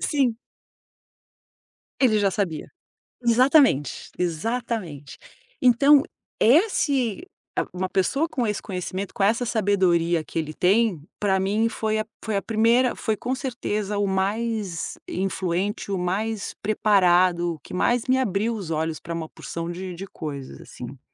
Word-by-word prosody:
Sim. 265 Hz, -6 st, +1 dB, 1.6 s
Ele 230 Hz, -5 st, +4 dB
já 200 Hz, -1 st, +2 dB
sabia. 180 Hz, -6 st, -3 dB, 0.5 s
Exatamente, 245 Hz, -, +3 dB
exatamente. 180 Hz, -, -3 dB, 0.4 s
Então 275 Hz, +4 st, +6 dB, 0.4 s
esse, 285 Hz, -, +2 dB, 0.3 s
ah, -, -, +1 dB
uma 185 Hz, +1 st, -2 dB
pessoa 275 Hz, -, +1 dB
com 245 Hz, -5 st, -1 dB
esse 210 Hz, -, -2 dB
conhecimento, 185 Hz, 0 st, -5 dB
com 195 Hz, -, -1 dB
essa 230 Hz, +4 st, +2 dB
sabedoria 185 Hz, -7 st, +2 dB
que 165 Hz, -, -4 dB
ele 155 Hz, -1 st, -4 dB
tem, 195 Hz, -2 st, +2 dB, 0.2 s
pra 195 Hz, -2 st, +2 dB
mim 210 Hz, +4 st, +1 dB
foi 220 Hz, -1 st, -1 dB
a 215 Hz, -, -2 dB, 0.2 s
foi 215 Hz, -3 st, -1 dB
a -, -, 0 dB
primeira 230 Hz, +4 st, +2 dB
foi 220 Hz, -2 st, -1 dB
com 255 Hz, +2 st, -2 dB
certeza 215 Hz, -5 st, -3 dB
o 205 Hz, -1 st, +1 dB
mais 200 Hz, -1 st, -2 dB
influente, 190 Hz, +1 st, -2 dB
o 195 Hz, -, 0 dB
mais 200 Hz, +4 st, -2 dB
preparado, 180 Hz, -5 st, +3 dB
o 155 Hz, -, -17 dB
que -, -, -13 dB
mais 240 Hz, +6 st, +2 dB
me 260 Hz, -, +3 dB
abriu 225 Hz, -2 st, 0 dB
os 185 Hz, -7 st, -6 dB
olhos 160 Hz, 0 st, -1 dB
pra 170 Hz, -, -6 dB
uma 165 Hz, -1 st, -4 dB
porção 165 Hz, 0 st, -6 dB
de 180 Hz, +1 st, -5 dB
de 195 Hz, +3 st, -7 dB
coisas, 140 Hz, -6 st, -7 dB
assim. 125 Hz, +2 st, -10 dB
200 Hz, 140 wpm, -24 LUFS, 180-230 Hz, 1.6 s, Então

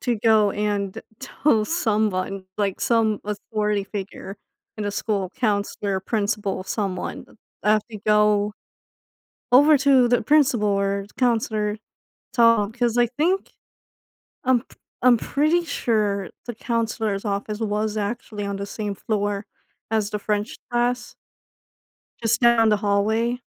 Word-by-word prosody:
to 240 Hz, -3 st, 0 dB
go 215 Hz, -1 st, +4 dB
and 205 Hz, -2 st, -2 dB, 0.2 s
tell 260 Hz, -4 st, +1 dB
someone, 210 Hz, -, -1 dB
like 200 Hz, -2 st, -1 dB
some 225 Hz, -3 st, +2 dB
authority 210 Hz, 0 st, -2 dB
figure 195 Hz, 0 st, -7 dB, 0.4 s
in 215 Hz, -, -4 dB
the 205 Hz, -, -1 dB
school 200 Hz, -2 st, -2 dB
counselor, 205 Hz, -3 st, -1 dB
principal, 205 Hz, -2 st, -1 dB
someone. 195 Hz, -3 st, -3 dB, 0.4 s
I 210 Hz, -, +4 dB
have 215 Hz, -1 st, +2 dB
to 215 Hz, -, -7 dB
go 210 Hz, -1 st, +3 dB, 1.0 s
over 290 Hz, +3 st, +7 dB
to 265 Hz, -2 st, +4 dB
the 245 Hz, 0 st, +2 dB
principal 265 Hz, -8 st, +3 dB
or 200 Hz, 0 st, 0 dB
counselor, 220 Hz, -4 st, 0 dB, 0.6 s
talk 230 Hz, -2 st, +3 dB
“'cause 240 Hz, -1 st, +1 dB
I 240 Hz, 0 st, +4 dB
think 320 Hz, +11 st, -1 dB, 0.9 s
I'm 255 Hz, -2 st, +3 dB
p -, -, -22 dB, 0.2 s
I'm 250 Hz, -1 st, +6 dB
pretty 310 Hz, +8 st, +1 dB
sure 210 Hz, -, -1 dB, 0.2 s
the 240 Hz, -, -5 dB
counselor's 225 Hz, -3 st, -2 dB
office 205 Hz, +1 st, -3 dB
was 215 Hz, 0 st, -1 dB
actually 210 Hz, 0 st, -4 dB
on 200 Hz, 0 st, -3 dB
the 200 Hz, 0 st, -5 dB
same 205 Hz, -1 st, -4 dB
floor 205 Hz, 0 st, -2 dB, 0.4 s
as 215 Hz, -2 st, 0 dB
the 210 Hz, -, -2 dB
French 210 Hz, +2 st, -2 dB
class 240 Hz, +1 st, -1 dB, 1.1 s
just 230 Hz, +1 st, +1 dB
down 235 Hz, -2 st, +5 dB
the 210 Hz, -, +4 dB
hallway. 215 Hz, +4 st, +1 dB
215 Hz, 130 wpm, -23 LUFS, 205-235 Hz, 1.1 s, over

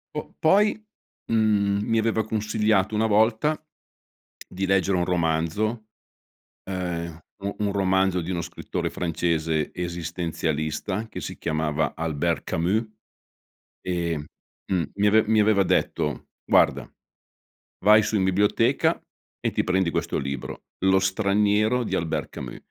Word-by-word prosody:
Po 150 Hz, -, -5 dB
poi, 205 Hz, +6 st, +4 dB, 0.5 s
mhmm, 105 Hz, -2 st, +2 dB
mi 115 Hz, 0 st, +2 dB
aveva 110 Hz, -1 st, +1 dB
consigliato 105 Hz, -1 st, +1 dB
una 110 Hz, -, +2 dB
volta 110 Hz, +8 st, +2 dB, 0.8 s
di 95 Hz, +1 st, -3 dB
leggere 95 Hz, 0 st, +2 dB
un 90 Hz, -, +1 dB
romanzo, 90 Hz, +6 st, 0 dB, 0.8 s
ehm, 85 Hz, -4 st, -4 dB, 0.2 s
un 100 Hz, +1 st, -3 dB
un 105 Hz, -1 st, 0 dB
romanzo 95 Hz, -2 st, +2 dB
di 85 Hz, -, -5 dB
uno 85 Hz, -, -1 dB
scrittore -, -, -4 dB
francese 80 Hz, -2 st, -1 dB
esistenzialista 85 Hz, +1 st, -3 dB
che -, -, -7 dB
si -, -, -6 dB
chiamava 80 Hz, -1 st, -1 dB
Albert 80 Hz, +1 st, -1 dB
Camus, 95 Hz, +8 st, 0 dB, 1.0 s
e, 85 Hz, -2 st, -1 dB, 0.5 s
mhmm, 95 Hz, -, 0 dB
mh, -, -, -7 dB
mi 105 Hz, +1 st, +2 dB
ave 110 Hz, +1 st, +5 dB
mi 110 Hz, -1 st, +4 dB
aveva 105 Hz, -2 st, +4 dB
detto: -, -, -1 dB, 0.2 s
"Guarda, -, -, +3 dB, 0.9 s
vai 105 Hz, +1 st, +7 dB
su 105 Hz, -, -1 dB
in 95 Hz, -, +2 dB
biblioteca 100 Hz, +2 st, +2 dB, 0.4 s
e -, -, 0 dB
ti -, -, 0 dB
prendi 90 Hz, -1 st, +1 dB
questo -, -, -1 dB
libro, 70 Hz, -1 st, -5 dB, 0.2 s
lo 95 Hz, 0 st, +5 dB
straniero 105 Hz, +4 st, +2 dB
di -, -, -2 dB
Albert 80 Hz, -1 st, -2 dB
Camus". -, -, -7 dB
95 Hz, 130 wpm, -25 LUFS, 85-110 Hz, 1.0 s, vai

